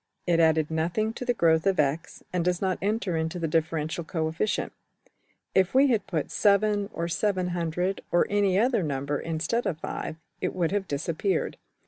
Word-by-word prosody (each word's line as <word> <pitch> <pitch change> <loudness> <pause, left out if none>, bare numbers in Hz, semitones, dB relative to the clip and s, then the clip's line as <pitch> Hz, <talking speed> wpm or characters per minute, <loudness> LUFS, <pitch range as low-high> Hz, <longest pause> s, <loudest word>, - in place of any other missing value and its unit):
It 170 -2 +2
added 160 -1 +3
nothing 175 +8 0
to 250 - -6
the 245 - +2
growth 160 -2 +3
of~$x$, 160 -4 0
and 180 -2 +1
does 180 0 +1
not 190 -2 -1
enter 200 -3 0
into 160 +2 -2
the 165 -2 -1
differential 160 +1 -1
coefficient. 160 +4 -1 0.8
If 190 +4 +2
we 275 +1 +6
had 220 -6 +1
put~$7$, 200 +5 +2
or~$700$, 180 0 -1
or 175 - +4
any 200 -2 +2
other 235 0 +3
number, 140 -2 -2
instead 165 +9 -1
of~$5$, 155 -1 -4 0.3
it - - -2
would 175 -2 0
have 200 -1 -1
disappeared. 165 +5 -1
175 Hz, 150 wpm, -27 LUFS, 160-200 Hz, 0.8 s, we